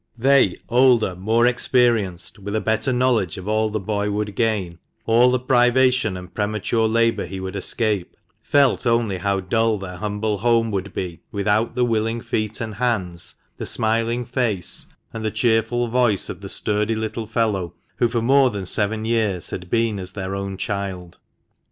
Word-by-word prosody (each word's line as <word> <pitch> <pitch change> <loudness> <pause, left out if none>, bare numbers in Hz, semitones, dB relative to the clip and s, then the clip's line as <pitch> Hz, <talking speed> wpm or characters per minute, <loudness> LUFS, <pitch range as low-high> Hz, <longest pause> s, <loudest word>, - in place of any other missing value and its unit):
They 130 -6 +4
older, 120 -5 +4
more 110 +6 +2
experienced, 120 -7 +1
with 100 +2 -5
a - - +2
better 110 +3 0
knowledge 125 -9 +1
of 95 +1 -8
all 110 0 +1
the 110 0 -2
boy 105 +1 -2
would 105 0 -3
gain 100 -7 -1
— - - -46
all 120 +2 +5
the 130 - +2
privation 125 -3 +3
and 90 0 -10
premature 110 +2 0
labour 115 +1 +1
he 95 - -6
would 95 +1 -5
escape 105 -1 -1
— - - -48
felt 140 -4 +2
only 115 -5 +1
how 100 0 0
dull 110 +4 +1
their 90 -2 -7
humble 105 0 -2
home 115 0 +2
would 100 0 -3
be 85 -3 -5
without 105 +2 0
the 125 - +2
willing 115 0 0
feet 110 -2 -3
and 110 -2 -4
hands, 100 -7 -1 0.2
the - - -5
smiling 115 +2 0
face, 120 -7 -2 0.3
and 115 -1 -5
the 110 - 0
cheerful 115 +2 +1
voice 120 -4 +1
of - - -7
the - - -7
sturdy 105 +1 0
little 110 0 -4
fellow 105 -7 -1 0.2
who 120 - +3
for 115 -1 -1
more 135 +2 +5
than 100 -4 -5
seven 110 +3 0
years 110 -6 0
had 90 -1 -6
been 115 -2 +1
as 95 0 -7
their 95 -1 -4
own 100 -1 -4
child. 95 -3 -4
110 Hz, 175 wpm, -22 LUFS, 100-115 Hz, 0.3 s, all